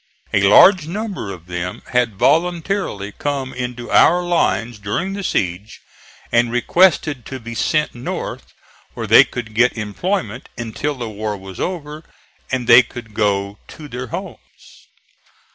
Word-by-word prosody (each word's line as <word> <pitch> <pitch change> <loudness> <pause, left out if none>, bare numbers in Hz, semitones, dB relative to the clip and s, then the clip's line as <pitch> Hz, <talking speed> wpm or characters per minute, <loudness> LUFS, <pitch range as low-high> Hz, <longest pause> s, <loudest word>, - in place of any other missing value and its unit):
A 100 - +3
large 155 - +6
number 195 - -4
of 90 -3 -10
them 90 0 -5
had 120 -5 +1
voluntarily 165 - 0
come 140 +1 -3
into 125 -1 -5
our 175 +2 +5
lines 120 -10 0
during 135 - -2
the 200 0 -5
siege, 95 - -2 0.5
and 120 0 +3
requested 145 +1 +2
to 130 - -6
be 115 0 -8
sent 150 +6 0
north 120 +1 -6 0.4
where - - -4
they - - +8
could 115 -3 -7
get 120 +2 +2
employment 115 - -3
until 120 +6 -3
the 120 -3 -5
war 105 -1 -4
was 95 -1 -11
over 155 -4 -4 0.5
and 130 -2 -1
they 120 +1 +9
could 120 -2 -10
go 100 -1 0
to 150 - -11
their 125 -1 -6
homes. - - -6
120 Hz, 145 wpm, -19 LUFS, 105-155 Hz, 0.5 s, they